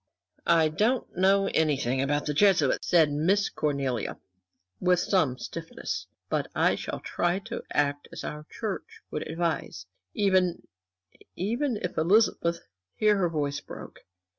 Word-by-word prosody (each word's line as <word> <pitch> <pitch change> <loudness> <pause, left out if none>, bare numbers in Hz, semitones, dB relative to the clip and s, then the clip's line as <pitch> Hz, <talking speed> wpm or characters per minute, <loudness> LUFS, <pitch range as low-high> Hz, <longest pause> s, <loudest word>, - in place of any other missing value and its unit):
"I 165 -2 +5
don't 220 +10 0
know 195 +2 +4
anything 135 -5 +1
about 145 +2 0
the 150 - -1
Jesuits," 175 -5 +3
said 160 -4 +5
Miss 185 +8 +2
Cornelia, 135 -6 -2 0.6
with 180 -1 +3
some 160 -12 +1
stiffness, - - -5 0.2
"but - - -1
I - - +4
shall - - -5
try 175 +1 0
to - - -5
act 145 0 0
as - - -7
our 150 +1 -6
Church 215 -4 -5
would - - -3
advise, 165 - -2 0.3
even 190 -4 +2 0.7
even 235 +6 -1
if 180 - -2
Elizabeth" 170 -1 +3 0.3
here 210 -1 +3
her 180 -3 +2
voice 145 -3 -1
broke. - - -10
170 Hz, 135 wpm, -27 LUFS, 145-195 Hz, 0.7 s, I